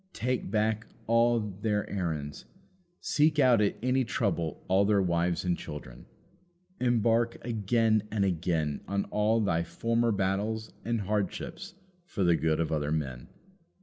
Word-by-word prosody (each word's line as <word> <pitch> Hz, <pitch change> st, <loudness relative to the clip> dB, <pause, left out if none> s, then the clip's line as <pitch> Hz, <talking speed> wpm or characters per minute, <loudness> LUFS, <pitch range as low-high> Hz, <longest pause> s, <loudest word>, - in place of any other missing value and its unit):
Take 125 Hz, -2 st, -2 dB
back 110 Hz, +1 st, 0 dB, 0.2 s
all 115 Hz, +1 st, +3 dB
their 105 Hz, 0 st, -2 dB
errands. 80 Hz, -7 st, -4 dB, 0.6 s
Seek 155 Hz, +1 st, +2 dB
out 125 Hz, -6 st, +5 dB
at 105 Hz, -, +1 dB
any 130 Hz, +1 st, +2 dB
trouble 95 Hz, -, -2 dB
all 95 Hz, +2 st, +4 dB
their 100 Hz, 0 st, +3 dB
wives 85 Hz, -1 st, 0 dB
and 90 Hz, -1 st, +2 dB
children. 75 Hz, -8 st, -9 dB, 0.7 s
Embark 115 Hz, -1 st, +2 dB
again 110 Hz, -1 st, +1 dB
and 105 Hz, -2 st, +1 dB
again 80 Hz, -5 st, -1 dB
on 100 Hz, 0 st, -1 dB
all 105 Hz, +2 st, +2 dB
thy 85 Hz, -5 st, +1 dB
former 115 Hz, +7 st, 0 dB
battles 105 Hz, +3 st, -1 dB
and 115 Hz, -1 st, -1 dB
hardships 105 Hz, -, -3 dB, 0.3 s
for 100 Hz, -, -2 dB
the 85 Hz, -1 st, +4 dB
good 80 Hz, 0 st, +1 dB
of 80 Hz, -2 st, -1 dB
other 75 Hz, -1 st, -1 dB
men. 65 Hz, -6 st, -3 dB
105 Hz, 140 wpm, -29 LUFS, 85-115 Hz, 0.7 s, out